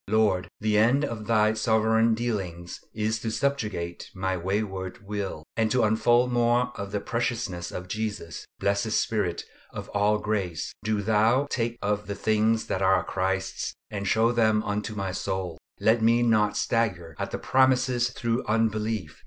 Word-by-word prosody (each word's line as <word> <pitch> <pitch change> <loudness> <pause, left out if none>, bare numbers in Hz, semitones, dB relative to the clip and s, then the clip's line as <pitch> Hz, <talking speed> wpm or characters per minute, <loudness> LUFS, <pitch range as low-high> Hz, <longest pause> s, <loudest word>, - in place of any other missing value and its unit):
Lord! 105 -4 +2
the 105 -1 +2
end 130 +7 +4
of 115 -5 -4
all - - -8
Thy 110 -1 +3
sovereign 110 +1 +3
dealings 95 -7 -4
is 110 +1 -1
to 110 - -3
subjugate 110 -8 -2
my 95 0 -1
wayward 95 +2 -3
will, 100 -6 -4
and 110 -1 +1
to 125 +1 +2
unfold 120 +3 +3
more 120 0 +2
of 100 0 -6
the 105 - -1
preciousness 115 -6 -2
of 90 0 -6
Jesus. 105 -6 -4
Blessed 100 +2 0
Spirit 105 -8 0 0.3
of - - -7
all 105 +1 +2
grace! 100 -7 -2
do 105 -1 0
Thou 110 +6 +3
take 120 -1 -1
of 105 0 -1
the 100 - -3
things 110 +2 +1
that 95 - -2
are 95 0 +3
Christ's 95 0 -2 0.2
and 100 -1 -3
show 115 +4 +3
them 110 -2 +2
unto 105 +2 -3
my 100 -2 -2
soul. 90 -3 -3 0.2
Let 110 +1 +3
me 115 +2 +4
not 110 -3 +2
stagger 90 -9 -1
at - - -2
the - - -3
promises 130 -2 +2
through 120 0 -2
unbelief. 110 -6 -1
110 Hz, 160 wpm, -26 LUFS, 95-115 Hz, 0.3 s, end